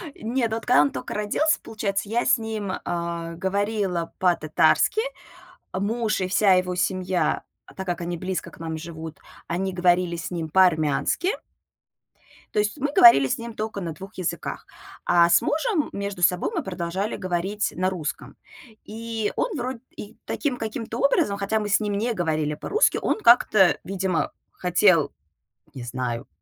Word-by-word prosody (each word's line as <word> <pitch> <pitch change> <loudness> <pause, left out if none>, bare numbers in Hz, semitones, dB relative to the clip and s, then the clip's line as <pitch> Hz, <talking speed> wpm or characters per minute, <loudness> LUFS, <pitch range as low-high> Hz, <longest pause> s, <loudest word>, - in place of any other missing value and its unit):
Нет, 230 0 -1
вот 225 - -4
когда 145 - +5
он 145 - +2
тока 130 - -6
родился, 210 +10 +1
получается, 205 -2 -3
я 235 +2 0
с - - +4
ним, 220 -3 -4
а, 170 -1 -3
говорила 190 -1 -1
по-татарски. 175 - +3 0.7
Муж 215 +2 -1
и 185 - -1
вся 195 0 +4
его 180 0 +1
семья, 185 0 0 0.3
так 190 0 -5
как 175 -1 -2
они 175 0 -3
близко 185 +2 -4
к - - -16
нам 160 -1 -4
живут, 160 -1 -8 0.3
они 190 +2 -2
говорили 180 -1 +2
с 185 +2 -5
ним 165 -3 -3
по-армянски. 180 - +2 1.1
То 210 - +1
есть 210 +7 0
мы 285 +1 -1
говорили 140 - +8
с - - -1
ним 235 0 -7
тока 215 -2 -4
на 165 -2 -4
2 195 +6 -11
языках, 185 -3 -4 0.4
а 170 -1 +5
с 170 - +5
мужем 320 -1 0
между 200 -2 -5
собой 180 - +2
мы 335 -7 -1
продолжали 185 +2 -3
говорить 185 +3 -2
на 185 +1 +1
русском. 170 -5 -5 0.5
И 225 0 -3
он 465 -8 -1
вроде 250 -1 -3 0.2
и 210 +2 -10
таким 270 -5 -2
каким-то 225 +1 -5
образом, 205 -7 +2
хотя 205 +2 0
мы 210 - -3
с 200 - +4
ним 205 -1 -2
не 230 +4 0
говорили 155 -5 -1
по-русски, 425 - +2
он - - 0
как-то, 215 - +5
видимо, 190 -2 -1 0.2
хотел, 180 -3 +3 0.6
не 130 - -7
знаю, 120 -1 -4
190 Hz, 160 wpm, -24 LUFS, 170-220 Hz, 1.1 s, говорили